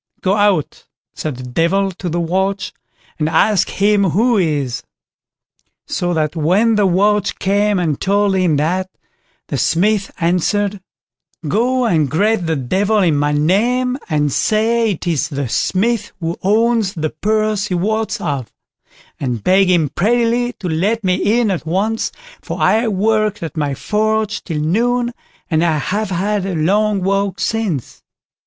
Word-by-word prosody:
"Go 190 Hz, -, +1 dB
out", 205 Hz, -7 st, 0 dB, 0.3 s
said 155 Hz, -4 st, -4 dB
the 130 Hz, -, -9 dB
Devil 170 Hz, +10 st, 0 dB
to 180 Hz, 0 st, -6 dB
the 170 Hz, +2 st, -1 dB
watch, 190 Hz, +3 st, -1 dB, 0.5 s
"and 155 Hz, 0 st, 0 dB
ask 200 Hz, +3 st, +2 dB
him 205 Hz, 0 st, +2 dB
who 220 Hz, +7 st, +2 dB
he 165 Hz, -6 st, +1 dB
is?" 130 Hz, -4 st, -3 dB, 1.0 s
So 175 Hz, 0 st, -2 dB
that 155 Hz, 0 st, -1 dB
when 185 Hz, +9 st, +2 dB
the 210 Hz, -2 st, +3 dB
watch 205 Hz, +2 st, +1 dB
came 205 Hz, +1 st, +1 dB
and 160 Hz, -6 st, -1 dB
told 200 Hz, 0 st, +2 dB
him 180 Hz, -5 st, +2 dB
that, 180 Hz, +5 st, -1 dB, 0.6 s
the -, -, -2 dB
Smith 200 Hz, +3 st, +1 dB
answered: 190 Hz, +4 st, 0 dB, 0.7 s
"Go 245 Hz, -, +1 dB
and 160 Hz, -, +2 dB
greet 195 Hz, -, +1 dB
the 160 Hz, -, +1 dB
Devil 190 Hz, -, 0 dB
in 165 Hz, -4 st, +2 dB
my 145 Hz, +1 st, +1 dB
name, 240 Hz, -, +1 dB
and 150 Hz, -2 st, +1 dB
say 225 Hz, +1 st, +1 dB
it 175 Hz, -, -8 dB
is 160 Hz, -3 st, 0 dB
the 140 Hz, -3 st, -3 dB
Smith 215 Hz, -, 0 dB
who 165 Hz, -1 st, -3 dB
owns 220 Hz, 0 st, +2 dB
the 155 Hz, -2 st, -2 dB
purse 215 Hz, +3 st, 0 dB
he 185 Hz, -, -2 dB
wots 215 Hz, +5 st, -1 dB
of; 140 Hz, -5 st, -3 dB, 0.7 s
and 125 Hz, -6 st, -3 dB
beg 190 Hz, 0 st, +4 dB
him 165 Hz, -5 st, +2 dB
prettily 235 Hz, -, +1 dB
to 185 Hz, -, -7 dB
let 200 Hz, +8 st, 0 dB
me 190 Hz, +5 st, +2 dB
in 225 Hz, -4 st, +1 dB
at 170 Hz, -4 st, -4 dB
once, 210 Hz, +6 st, -1 dB, 0.3 s
for -, -, -6 dB
I 225 Hz, +2 st, +3 dB
worked 215 Hz, 0 st, 0 dB
at 160 Hz, -, -6 dB
my 145 Hz, -3 st, -1 dB
forge 215 Hz, +3 st, -1 dB
till 155 Hz, -4 st, -3 dB
noon, 240 Hz, +9 st, 0 dB, 0.4 s
and 160 Hz, +1 st, +2 dB
I 165 Hz, -3 st, +2 dB
have 205 Hz, +8 st, -2 dB
had 195 Hz, +2 st, -1 dB
a 190 Hz, -, -2 dB
long 200 Hz, +5 st, +1 dB
walk 195 Hz, 0 st, 0 dB
since." 205 Hz, -, -2 dB
195 Hz, 155 wpm, -17 LUFS, 165-215 Hz, 1.0 s, beg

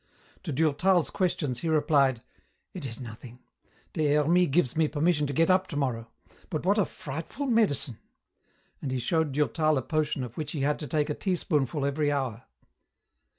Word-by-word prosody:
To 160 Hz, -, -3 dB
Durtal's 160 Hz, +4 st, +2 dB
questions 150 Hz, -, -1 dB
he 165 Hz, -, -2 dB
replied, 140 Hz, -6 st, +2 dB, 0.5 s
"It 170 Hz, -7 st, -5 dB
is 115 Hz, -2 st, -8 dB
nothing. 120 Hz, 0 st, -9 dB, 0.6 s
Des 150 Hz, -2 st, +2 dB
Hermies 170 Hz, +4 st, +4 dB
gives 135 Hz, -4 st, +1 dB
me 160 Hz, -1 st, +3 dB
permission 150 Hz, 0 st, +1 dB
to -, -, -3 dB
get 165 Hz, +6 st, +3 dB
up 185 Hz, +1 st, +3 dB
tomorrow. 125 Hz, -6 st, -2 dB, 0.4 s
But 160 Hz, -2 st, -3 dB
what 200 Hz, +3 st, +3 dB
a 200 Hz, -, +3 dB
frightful 160 Hz, -, -6 dB
medicine!" 205 Hz, -, +2 dB, 0.8 s
and 140 Hz, -, -3 dB
he 130 Hz, -, -1 dB
showed 160 Hz, +4 st, 0 dB
Durtal 155 Hz, +1 st, +2 dB
a 130 Hz, -, -1 dB
potion 155 Hz, -4 st, -1 dB
of 125 Hz, -1 st, -8 dB
which 150 Hz, -1 st, -4 dB
he 150 Hz, -, -3 dB
had 145 Hz, +2 st, +1 dB
to 150 Hz, -, -5 dB
take 150 Hz, +2 st, 0 dB
a -, -, +1 dB
teaspoonful 150 Hz, -6 st, -1 dB
every 145 Hz, +1 st, +1 dB
hour. 130 Hz, -4 st, -2 dB
150 Hz, 170 wpm, -28 LUFS, 135-165 Hz, 0.8 s, Hermies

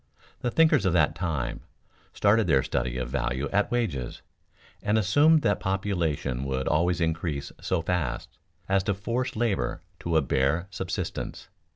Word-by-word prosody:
The 120 Hz, -, -1 dB
thinkers 155 Hz, -5 st, +4 dB
of 90 Hz, -, +2 dB
that 80 Hz, -3 st, +3 dB
time 80 Hz, -8 st, -2 dB, 0.5 s
started 105 Hz, +1 st, +3 dB
their 70 Hz, -5 st, +4 dB
study 60 Hz, -1 st, -2 dB
of 65 Hz, -1 st, -3 dB
value 65 Hz, +1 st, -1 dB
at 100 Hz, +1 st, +1 dB
wages, 90 Hz, -, -2 dB, 0.6 s
and 105 Hz, +1 st, +1 dB
assumed 145 Hz, -, +4 dB
that 100 Hz, -, +2 dB
population 85 Hz, -9 st, -1 dB
would 65 Hz, -1 st, -2 dB
always 85 Hz, +3 st, +2 dB
increase 80 Hz, -4 st, -2 dB
so 90 Hz, -3 st, -1 dB
fast 80 Hz, -9 st, -2 dB, 0.3 s
as 95 Hz, 0 st, +3 dB
to 100 Hz, -, +1 dB
force 120 Hz, +6 st, -2 dB
labor 110 Hz, -3 st, -1 dB, 0.2 s
to 85 Hz, -1 st, 0 dB
a 80 Hz, -, +3 dB
bare 70 Hz, +6 st, +1 dB
subsistence. 90 Hz, -2 st, -4 dB
85 Hz, 150 wpm, -27 LUFS, 70-100 Hz, 0.6 s, thinkers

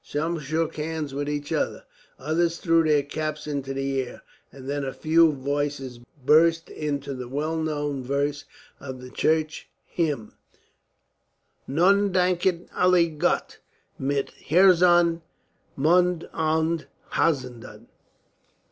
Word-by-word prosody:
Some 165 Hz, +3 st, -2 dB
shook 155 Hz, +3 st, -2 dB
hands 155 Hz, -2 st, -3 dB
with 145 Hz, +1 st, -3 dB
each 145 Hz, 0 st, -3 dB
other, -, -, -1 dB, 0.3 s
others 165 Hz, +4 st, 0 dB
threw 165 Hz, -1 st, +3 dB
their 150 Hz, -2 st, +3 dB
caps 155 Hz, +1 st, -4 dB
into 140 Hz, -2 st, -3 dB
the 135 Hz, 0 st, -1 dB
air, 125 Hz, -, -9 dB, 0.3 s
and 135 Hz, -1 st, -11 dB
then 145 Hz, 0 st, -2 dB
a 135 Hz, -, -4 dB
few 165 Hz, 0 st, +4 dB
voices 140 Hz, -2 st, -3 dB, 0.3 s
burst 165 Hz, +3 st, +4 dB
into 140 Hz, -2 st, -3 dB
the 125 Hz, -2 st, -6 dB
well 150 Hz, +5 st, -2 dB
known 145 Hz, -3 st, -2 dB
verse 140 Hz, +2 st, -1 dB, 0.3 s
of 130 Hz, -2 st, -8 dB
the 125 Hz, 0 st, -11 dB
church 155 Hz, +2 st, 0 dB, 0.2 s
hymn: 145 Hz, -10 st, -2 dB, 1.3 s
Nun 195 Hz, +7 st, +3 dB
danket 180 Hz, -1 st, +1 dB
alle 180 Hz, -2 st, +4 dB
Gott, 155 Hz, -2 st, -1 dB, 0.4 s
Mit 140 Hz, +1 st, -1 dB, 0.2 s
herzen, 175 Hz, -1 st, +5 dB, 0.5 s
mund 175 Hz, +3 st, +2 dB
und 160 Hz, +1 st, 0 dB, 0.2 s
haenden. 125 Hz, -7 st, -2 dB
155 Hz, 120 wpm, -25 LUFS, 140-165 Hz, 1.3 s, herzen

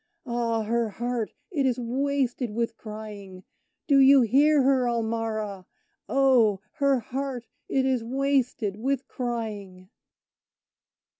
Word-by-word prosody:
Ah! 235 Hz, -2 st, -1 dB
her 230 Hz, +1 st, 0 dB
heart 240 Hz, +1 st, -3 dB, 0.2 s
it 295 Hz, -6 st, 0 dB
is 250 Hz, -1 st, 0 dB
wasted 255 Hz, 0 st, -1 dB
with 230 Hz, +2 st, -2 dB
crying 210 Hz, -4 st, -9 dB, 0.4 s
Do 280 Hz, -2 st, +4 dB
you 270 Hz, 0 st, +7 dB
hear 285 Hz, +5 st, +4 dB
her, 260 Hz, -2 st, +3 dB
Ulmarra? 220 Hz, -4 st, -2 dB, 0.4 s
Oh! 250 Hz, -7 st, +4 dB, 0.2 s
her 280 Hz, -2 st, +3 dB
heart 260 Hz, 0 st, -4 dB, 0.2 s
it 265 Hz, -1 st, +1 dB
is 260 Hz, -3 st, +1 dB
wasted 255 Hz, -5 st, 0 dB
with 265 Hz, +3 st, -2 dB
crying! 210 Hz, -6 st, -5 dB
240 Hz, 115 wpm, -26 LUFS, 220-270 Hz, 0.4 s, you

